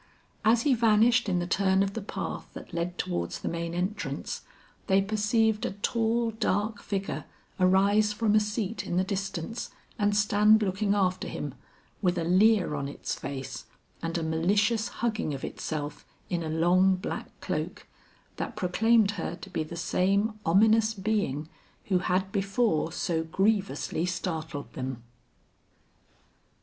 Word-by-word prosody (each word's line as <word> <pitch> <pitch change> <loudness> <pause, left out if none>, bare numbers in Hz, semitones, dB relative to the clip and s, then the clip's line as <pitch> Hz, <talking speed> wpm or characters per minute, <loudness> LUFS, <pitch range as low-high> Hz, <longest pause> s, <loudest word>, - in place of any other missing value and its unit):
As 225 +1 +4
he 285 - +4
vanished 230 0 +4
in 180 - +1
the 175 - 0
turn 190 +1 +2
of 195 0 -2
the 225 - -4
path 200 - -5
that - - -10
led 170 +1 -2
towards 85 -1 -2
the - - -5
main 170 0 -3
entrance, 180 -6 -3 0.5
they 190 0 +4
perceived 215 +2 +1
a - - -1
tall 230 +3 0
dark 210 0 -1
figure 195 -1 -3 0.3
arise 200 +3 +4
from 210 0 +1
a 215 - +6
seat 210 0 -2
in 175 - -2
the 185 - +3
distance 195 +1 -3 0.3
and 205 0 +2
stand 210 +1 +5
looking 200 +1 +1
after 185 -2 +1
him, - - -5 0.5
with 180 -3 +1
a 170 - 0
leer 185 +1 +4
on 140 -2 -2
its 140 - -4
face 135 -1 -6 0.4
and 165 +1 -2
a 165 - -2
malicious 205 +8 +2 0.2
hugging 215 -10 -1
of 135 - -8
itself 150 -2 -5 0.3
in 175 -1 0
a 160 - -3
long 180 +4 +4
black 185 - -4
cloak, - - -4 0.5
that 235 - -4
proclaimed 215 +2 +3
her 180 -3 -4
to 195 +1 -11
be 165 - -1
the 155 +2 -8
same 200 +5 +1
ominous 220 +5 +4
being 190 -8 -1 0.4
who 185 -2 +3
had 190 +1 0
before 195 -4 +1
so 160 -1 -1
grievously 190 -2 0
startled 160 -5 -4
them. 130 -2 -5
195 Hz, 150 wpm, -28 LUFS, 170-215 Hz, 0.5 s, a